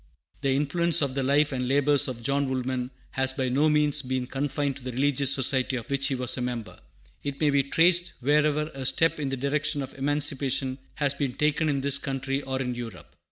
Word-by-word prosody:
The 135 Hz, -1 st, +1 dB
influence 155 Hz, +3 st, +2 dB
of 135 Hz, -2 st, -1 dB
the 135 Hz, -, -1 dB
life 145 Hz, +3 st, +2 dB
and 125 Hz, -2 st, -2 dB
labors 145 Hz, +1 st, +3 dB
of 120 Hz, -3 st, -6 dB
John 140 Hz, +2 st, 0 dB
Woolman 130 Hz, -1 st, -2 dB, 0.2 s
has 130 Hz, 0 st, +1 dB
by 130 Hz, -2 st, -1 dB
no 145 Hz, +5 st, +3 dB
means 150 Hz, -1 st, +2 dB
been 130 Hz, -1 st, -2 dB
confined 140 Hz, +1 st, -2 dB
to 135 Hz, -, -8 dB
the 125 Hz, -1 st, -5 dB
religious 140 Hz, +1 st, +2 dB
society 130 Hz, -1 st, +1 dB
of 120 Hz, +2 st, -6 dB
which 140 Hz, 0 st, +1 dB
he 135 Hz, -, -1 dB
was 125 Hz, -1 st, +1 dB
a -, -, -3 dB
member. 120 Hz, -3 st, -4 dB, 0.4 s
It 140 Hz, -1 st, -4 dB
may 150 Hz, -2 st, +3 dB
be 140 Hz, 0 st, +4 dB
traced 175 Hz, +5 st, +3 dB
wherever 150 Hz, +3 st, +2 dB
a 135 Hz, -1 st, -3 dB
step 165 Hz, +2 st, +2 dB
in 140 Hz, -2 st, -2 dB
the 135 Hz, -, -2 dB
direction 145 Hz, +2 st, -1 dB
of 135 Hz, -, -8 dB
emancipation 140 Hz, -2 st, -1 dB, 0.2 s
has 145 Hz, -3 st, +1 dB
been 140 Hz, -2 st, -2 dB
taken 150 Hz, +2 st, +1 dB
in 140 Hz, -2 st, 0 dB
this 140 Hz, 0 st, +2 dB
country 135 Hz, 0 st, -2 dB
or 130 Hz, -1 st, -3 dB
in 125 Hz, -2 st, -2 dB
Europe. 115 Hz, -7 st, -8 dB
140 Hz, 210 wpm, -26 LUFS, 130-145 Hz, 0.4 s, be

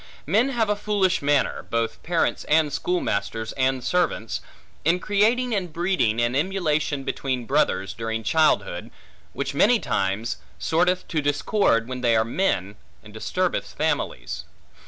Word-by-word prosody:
Men 220 Hz, -, +3 dB
have 235 Hz, -4 st, +1 dB
a 210 Hz, -, +1 dB
foolish 205 Hz, -3 st, +1 dB
manner 145 Hz, -1 st, +1 dB
(both 115 Hz, -1 st, -1 dB
parents 170 Hz, 0 st, 0 dB
and 150 Hz, -1 st, +3 dB
schoolmasters 110 Hz, -, -1 dB
and 130 Hz, -1 st, 0 dB
servants) 165 Hz, -7 st, 0 dB, 0.4 s
in 170 Hz, +3 st, +3 dB
creating 220 Hz, +6 st, +2 dB
and 185 Hz, -5 st, -1 dB
breeding 170 Hz, -, +1 dB
an 120 Hz, +2 st, +1 dB
emulation 150 Hz, -4 st, 0 dB
between 130 Hz, -3 st, -2 dB
brothers, 135 Hz, -8 st, +1 dB
during 115 Hz, 0 st, -3 dB
childhood, 100 Hz, -, +1 dB, 0.4 s
which -, -, -3 dB
many -, -, +5 dB
times 100 Hz, +4 st, -1 dB, 0.2 s
sorteth 180 Hz, +3 st, +1 dB
to 155 Hz, -3 st, 0 dB
discord 145 Hz, -, +1 dB
when 130 Hz, 0 st, -5 dB
they 120 Hz, -2 st, +3 dB
are 110 Hz, 0 st, +3 dB
men, 105 Hz, -, -1 dB, 0.3 s
and -, -, -14 dB
disturbeth -, -, -2 dB
families. -, -, -2 dB
145 Hz, 135 wpm, -24 LUFS, 115-180 Hz, 0.4 s, many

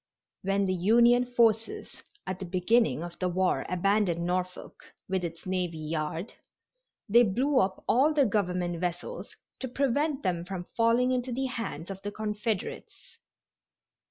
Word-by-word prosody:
When 195 Hz, +1 st, +1 dB
the 185 Hz, -, 0 dB
Union 235 Hz, +7 st, +4 dB
forces 225 Hz, -2 st, +1 dB, 0.2 s
at 185 Hz, 0 st, -4 dB
the 190 Hz, -, -5 dB
beginning 180 Hz, -, +2 dB
of 175 Hz, 0 st, -8 dB
the 185 Hz, -, 0 dB
war 185 Hz, +1 st, 0 dB
abandoned 180 Hz, -2 st, +1 dB
Norfolk, 180 Hz, +1 st, -3 dB, 0.3 s
with 190 Hz, -1 st, -1 dB
its 165 Hz, -1 st, -6 dB
navy 180 Hz, -3 st, -2 dB
yard, 155 Hz, +5 st, -3 dB, 0.7 s
they 235 Hz, +3 st, +6 dB
blew 255 Hz, +6 st, +2 dB
up 190 Hz, -4 st, 0 dB
all 270 Hz, +6 st, +4 dB
the 295 Hz, -3 st, +3 dB
Government 180 Hz, -5 st, -1 dB
vessels 180 Hz, -, -4 dB, 0.2 s
to 260 Hz, -, -3 dB
prevent 280 Hz, +3 st, 0 dB
them 175 Hz, -2 st, 0 dB
from 180 Hz, -1 st, -6 dB
falling 235 Hz, +2 st, +3 dB
into 255 Hz, 0 st, -1 dB
the 265 Hz, +3 st, -1 dB
hands 230 Hz, -, -4 dB
of 195 Hz, 0 st, -8 dB
the 205 Hz, -, -4 dB
Confederates. 210 Hz, -1 st, -4 dB
195 Hz, 145 wpm, -28 LUFS, 180-240 Hz, 0.7 s, they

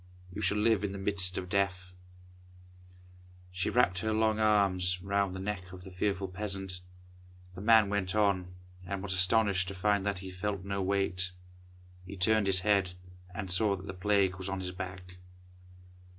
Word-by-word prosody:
You 105 Hz, -, -5 dB
shall 105 Hz, +1 st, +1 dB
live 105 Hz, -1 st, +2 dB
in 100 Hz, -1 st, -2 dB
the -, -, -5 dB
midst 95 Hz, -2 st, +2 dB
of 90 Hz, -, -4 dB
death." 95 Hz, -1 st, -1 dB, 1.6 s
She 90 Hz, 0 st, -2 dB
wrapt 95 Hz, -7 st, +2 dB
her 110 Hz, +2 st, -1 dB
long 110 Hz, 0 st, +1 dB
arms 95 Hz, -4 st, +2 dB
round 100 Hz, -1 st, 0 dB
the -, -, -5 dB
neck 95 Hz, -2 st, -4 dB
of 90 Hz, 0 st, -10 dB
the 95 Hz, -, -10 dB
fearful 95 Hz, +1 st, -1 dB
peasant. 95 Hz, -1 st, -4 dB, 0.7 s
The 90 Hz, -, -9 dB
man 110 Hz, 0 st, +6 dB
went 100 Hz, -1 st, -1 dB
on, 95 Hz, -4 st, +1 dB, 0.3 s
and 95 Hz, +1 st, -5 dB
was 100 Hz, -2 st, -2 dB
astonished 95 Hz, 0 st, +3 dB
to 100 Hz, -, -5 dB
find 100 Hz, +1 st, +1 dB
that 100 Hz, -1 st, -1 dB
he 95 Hz, +1 st, -7 dB
felt 95 Hz, 0 st, -4 dB
no 100 Hz, 0 st, -2 dB
weight. 95 Hz, -1 st, 0 dB, 0.7 s
He 100 Hz, +1 st, -8 dB
turned 105 Hz, +2 st, +3 dB
his 95 Hz, -1 st, +3 dB
head, 95 Hz, -3 st, +1 dB, 0.4 s
and 95 Hz, -1 st, -4 dB
saw 100 Hz, +2 st, +2 dB
that 95 Hz, 0 st, -10 dB
the 95 Hz, -, -6 dB
Plague 95 Hz, 0 st, +1 dB
was 95 Hz, 0 st, -4 dB
on 95 Hz, 0 st, -3 dB
his 90 Hz, -1 st, -4 dB
back. 90 Hz, -1 st, -8 dB
95 Hz, 175 wpm, -31 LUFS, 90-100 Hz, 1.6 s, man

